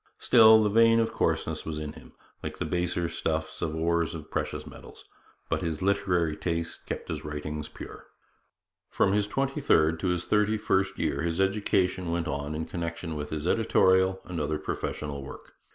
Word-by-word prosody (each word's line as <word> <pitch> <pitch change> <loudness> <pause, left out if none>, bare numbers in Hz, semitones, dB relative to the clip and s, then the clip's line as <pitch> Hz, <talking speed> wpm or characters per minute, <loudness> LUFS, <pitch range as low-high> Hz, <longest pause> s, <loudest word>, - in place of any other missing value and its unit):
Still, 110 -2 +7
the 105 - +2
vein 115 +1 +5
of 115 - 0
coarseness - - -1
was 80 -1 -4
in 75 -1 -5
him, - - -15 0.3
like - - -6
the - - -2
baser 90 -1 -1
stuffs 80 -1 -3
in 80 - -1
the - - -4
ores 85 0 0
of 80 -1 -9
precious - - -3
metals; - - -12 0.4
but - - -1
his 80 0 -3
literary 90 -5 +1
taste 85 0 -4
kept - - -5
his - - -4
writings 75 0 -5
pure. - - -10 0.8
From 95 - +2
his 105 0 +1
twenty 135 +6 -1
third 80 - +3
to 95 - -1
his 90 -1 0
thirty 105 +1 +2
first 95 -2 0
year - - -1
his 85 +1 -1
education 95 -2 +1
went 85 0 -1
on 70 +2 -3
in 80 +1 -3
connection 85 0 -4
with 75 0 -4
his 75 0 -4
editorial 95 -2 +3
and 90 -2 -5
other 75 +1 -1
professional 75 -2 -4
work. 65 - -11
85 Hz, 185 wpm, -28 LUFS, 80-95 Hz, 0.8 s, Still